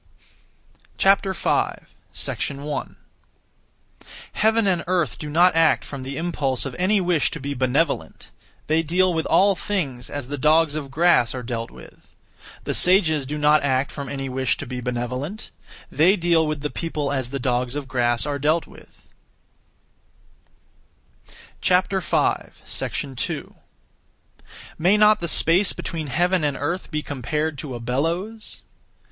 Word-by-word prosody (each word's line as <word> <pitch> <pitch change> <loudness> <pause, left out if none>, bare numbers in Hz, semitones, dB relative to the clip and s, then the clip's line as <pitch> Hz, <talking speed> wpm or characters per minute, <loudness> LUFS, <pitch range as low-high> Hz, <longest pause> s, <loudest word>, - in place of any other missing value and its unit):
5. 195 -1 +1 0.5
1. 140 +1 -5 1.4
Heaven 220 +1 +2
and 180 -4 +1
earth 180 -3 0
do 150 - -6
not 175 +3 +4
act 165 -1 +3
from 140 -2 -7
(the 135 +2 -6
impulse 145 -7 -1
of) 135 - -5
any 200 +3 +3
wish 175 -5 +1
to 165 - -6
be 140 +1 -4
benevolent; 135 +4 -1 0.3
they 160 +1 +2
deal 180 +3 +2
with 160 -1 -1
all 200 +1 +4
things 165 -11 -3
as 145 -4 -5
the 145 +1 -5
dogs 155 +1 +3
of 150 -3 -4
grass 145 -5 +3
are 125 - -5
dealt 115 -1 -4
with. - - -16 0.5
The - - -2
sages 160 -7 +4
do 150 +2 -3
not 150 0 +4
act 135 0 0
from 140 -2 -6
(any 135 -1 -4
wish 130 0 -1
to - - -5
be) 125 -1 -5
benevolent; 125 - -4 0.4
they 175 +6 +4
deal 170 -3 +2
with 150 -1 -3
the 150 - -3
people 150 -4 -3
as 130 -3 -2
the 140 - -3
dogs 125 0 -1
of 145 -2 -4
grass 120 -2 0
are 145 -1 -2
dealt 155 +4 +1
with. - - -18 2.5
2. 180 -7 -1 1.3
May 185 +6 +4
not 210 0 +5
the 170 - -2
space 170 +4 +4
between 160 -3 -5
heaven 175 +5 +1
and 145 -2 0
earth 180 +2 -3
be 150 -2 -3
compared 145 +3 -3
to 135 -4 -6
a - - -6
bellows? 165 - -3
150 Hz, 140 wpm, -23 LUFS, 135-175 Hz, 2.5 s, not